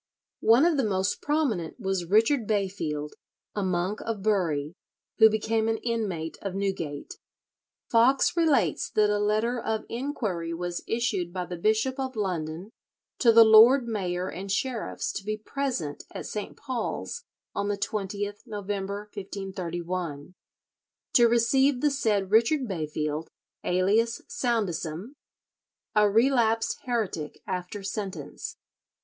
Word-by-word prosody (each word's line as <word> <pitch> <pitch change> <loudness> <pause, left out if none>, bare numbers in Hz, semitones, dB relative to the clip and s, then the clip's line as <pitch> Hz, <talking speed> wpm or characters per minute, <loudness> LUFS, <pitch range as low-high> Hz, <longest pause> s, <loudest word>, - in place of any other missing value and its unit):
One 235 +7 +5
of 340 -3 +3
the 270 - +2
most 190 -3 0
prominent 265 - -1
was 190 -4 -1
Richard 225 +3 +3
Bayfield, 185 -8 -2 0.4
a 205 - -2
monk 185 +2 -1
of 220 -4 -4
Bury, 165 -8 +1 0.5
who 220 - +9
became 220 +1 0
an 225 0 +1
inmate 205 -9 -3
of 195 -2 -4
Newgate. 180 -7 -3 0.7
Foxe 250 +7 +4
relates 285 - +2
that 210 -1 +3
a 205 - +1
letter 215 +4 +1
of 220 -1 -2
inquiry 215 - -3
was 175 0 -4
issued 215 -7 -1
by 180 0 -3
the 180 - -6
Bishop 220 +9 +1
of 260 -1 -3
London 180 -2 -3 0.5
to 235 - +6
the 230 0 +9
lord 230 +4 +7
mayor 185 -5 -2
and 195 +2 -5
sheriffs 240 +3 -2
to 195 - -5
be 215 +1 -2
present 215 - -3
at - - -7
St. 210 -1 -5
Paul's 260 - -4 0.3
on 200 0 -1
the 205 0 -1
20th 205 0 -3
November, 200 -1 -3
1531, 180 -5 -5 0.8
to 240 -1 +7
receive 245 +3 +3
the 295 - +3
said 210 -8 0
Richard 240 +5 +3
Bayfield, 155 -3 -3 0.3
alias 205 +6 +2
Soundesam, 200 - -2 0.8
"a 210 -1 +5
relapsed 225 0 +2
heretic 215 -11 -3
after 185 +2 -4
sentence." 200 -1 -5
205 Hz, 130 wpm, -27 LUFS, 180-230 Hz, 0.8 s, who